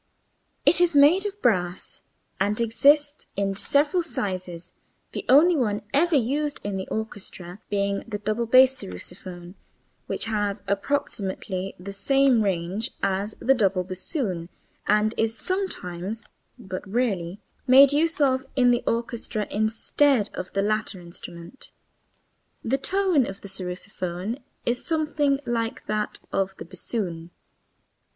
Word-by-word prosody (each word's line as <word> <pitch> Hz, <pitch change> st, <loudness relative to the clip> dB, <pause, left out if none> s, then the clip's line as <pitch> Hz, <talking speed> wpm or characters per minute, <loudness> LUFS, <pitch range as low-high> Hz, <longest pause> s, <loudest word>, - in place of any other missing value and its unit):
It 350 Hz, -, +6 dB
is 345 Hz, -3 st, +3 dB
made 320 Hz, +8 st, +6 dB
of 405 Hz, 0 st, -8 dB
brass 180 Hz, -7 st, 0 dB, 0.4 s
and 205 Hz, +3 st, +1 dB
exists 285 Hz, +6 st, +3 dB
in 195 Hz, 0 st, 0 dB
several 290 Hz, -, +2 dB
sizes, 185 Hz, -, -4 dB, 0.4 s
the -, -, -4 dB
only 320 Hz, +7 st, +7 dB
one 210 Hz, -7 st, 0 dB
ever 330 Hz, +4 st, +3 dB
used 285 Hz, +4 st, 0 dB
in 205 Hz, -1 st, -3 dB
the 190 Hz, 0 st, -4 dB
orchestra 200 Hz, -4 st, -6 dB
being 200 Hz, -1 st, 0 dB
the 215 Hz, -2 st, -3 dB
double 215 Hz, +3 st, -2 dB
bass 260 Hz, +2 st, +7 dB
sarrusophone, 175 Hz, -, -8 dB, 0.5 s
which -, -, -2 dB
has 205 Hz, -3 st, -1 dB
approximately 195 Hz, -4 st, -2 dB
the 195 Hz, +2 st, -7 dB
same 270 Hz, +3 st, +3 dB
range 195 Hz, +4 st, -1 dB
as 200 Hz, +2 st, -1 dB
the 265 Hz, -, +4 dB
double 195 Hz, -6 st, +2 dB
bassoon 185 Hz, -, -3 dB, 0.4 s
and 210 Hz, +1 st, +3 dB
is 225 Hz, 0 st, 0 dB
sometimes 220 Hz, -, -3 dB, 0.3 s
(but 190 Hz, -6 st, -6 dB
rarely) 200 Hz, -5 st, -1 dB, 0.3 s
made 270 Hz, +2 st, +8 dB
use 325 Hz, +3 st, +2 dB
of 260 Hz, -2 st, +3 dB
in 250 Hz, -2 st, +5 dB
the 240 Hz, 0 st, +2 dB
orchestra 230 Hz, -2 st, -2 dB
instead 220 Hz, +3 st, +2 dB
of 185 Hz, -, -6 dB
the 195 Hz, -, +1 dB
latter 215 Hz, -2 st, -1 dB
instrument. 170 Hz, +5 st, -10 dB, 0.9 s
The 265 Hz, +4 st, 0 dB
tone 370 Hz, -5 st, +2 dB
of 195 Hz, -, -8 dB
the -, -, -8 dB
sarrusophone 185 Hz, +2 st, -4 dB, 0.3 s
is 240 Hz, +1 st, 0 dB
something 300 Hz, -3 st, +1 dB
like 230 Hz, -1 st, -2 dB
that 215 Hz, 0 st, -2 dB, 0.2 s
of 195 Hz, 0 st, -1 dB
the -, -, -8 dB
bassoon. 175 Hz, -2 st, -4 dB
215 Hz, 130 wpm, -25 LUFS, 190-270 Hz, 0.9 s, made